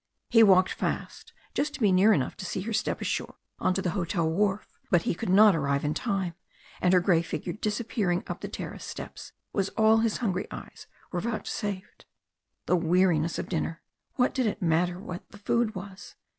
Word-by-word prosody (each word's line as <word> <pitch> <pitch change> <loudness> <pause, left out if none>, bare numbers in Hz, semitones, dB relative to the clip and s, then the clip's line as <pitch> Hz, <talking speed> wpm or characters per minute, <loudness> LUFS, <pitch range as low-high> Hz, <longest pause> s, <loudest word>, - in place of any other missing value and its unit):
He 225 -2 +7
walked 190 -3 +6
fast, - - -4 0.2
just 295 +1 -1
to - - -8
be 210 -5 +4
near 190 +4 +5
enough 145 -11 +1
to 200 - -6
see 185 - -3
her 225 +4 -4
step - - -1
ashore - - -2 0.2
on 185 - +1
to 195 - -1
the 180 - 0
hotel 170 -2 -1
wharf, 195 +4 0 0.2
but 175 -3 +3
he - - 0
could 170 - -4
not 205 +1 +7
arrive 140 -2 0
in 150 - +1
time, 195 -6 -1 0.5
and 180 - +3
her 185 - +6
grey 175 -2 +3
figure 170 +1 -4
disappearing 210 -4 -1
up - - -6
the - - -4
terrace - - -7
steps - - -8 0.2
was 195 -1 0
all 220 0 +5
his 225 -1 +1
hungry 195 -7 -1
eyes - - -10 0.2
were 175 - -2
vouchsafed. 210 -2 -4 0.6
The - - +3
weariness 170 -1 +2
of - - -4
dinner! 165 -1 -3 0.3
What 250 -2 +2
did 255 -3 +1
it 205 - -2
matter 175 +1 +1
what 180 -2 -8
the - - -13
food 220 +2 0
was? 190 +1 -9
190 Hz, 195 wpm, -28 LUFS, 175-215 Hz, 0.6 s, He